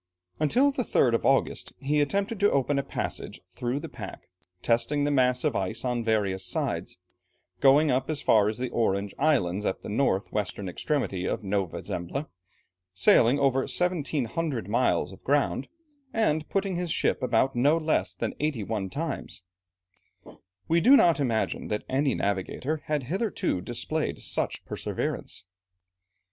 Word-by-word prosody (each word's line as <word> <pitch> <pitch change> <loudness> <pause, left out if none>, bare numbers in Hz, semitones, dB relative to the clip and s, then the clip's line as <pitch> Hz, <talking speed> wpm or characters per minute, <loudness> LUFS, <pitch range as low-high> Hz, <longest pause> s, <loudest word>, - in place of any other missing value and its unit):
Until 250 - +3
the 270 - -2
3rd 125 - +2
of 115 - +1
August, 135 0 +1
he 145 +2 +1
attempted 200 +8 -1
to 205 +1 +4
open 140 +1 +1
a - - -1
passage - - -5
through 125 +2 -2
the - - -6
pack, - - -9 0.3
testing 145 +5 +1
the 145 - +1
mass 125 -2 +2
of - - +1
ice 95 +4 -2
on 120 -2 -1
various 100 -4 0
sides, 90 - -2 0.6
going 140 +5 +5
up 130 +2 0
as 155 -2 0
far 105 -5 +4
as 110 - -4
the 125 -1 -3
Orange 100 -4 0
Islands 105 - +2
at 95 - -2
the - - -6
north 105 -3 0
western 100 -1 -3
extremity 95 - -2
of - - -2
Nova 95 -3 -2
Zembla, 90 - -4 0.7
sailing 115 +7 +5
over 135 -2 +2
1700 150 - -1
miles 120 +5 +1
of - - -14
ground, - - +1 0.4
and 160 -9 0
putting 195 -2 -1
his 175 -1 -2
ship - - +1
about 125 +2 +1
no 145 +7 +4
less 155 -1 0
than - - -3
eighty 145 -7 -1
one 100 -2 -3
times. 145 - -5 1.2
We 165 +1 +3
do 270 +8 +8
not 170 - +4
imagine 115 -6 -1
that 105 - -2
any 135 +1 +1
navigator 100 +9 -2
had 150 -2 -1
hitherto 185 - -1
displayed 120 - -2
such - - -2
perseverance. - - -4
135 Hz, 155 wpm, -27 LUFS, 110-155 Hz, 1.2 s, do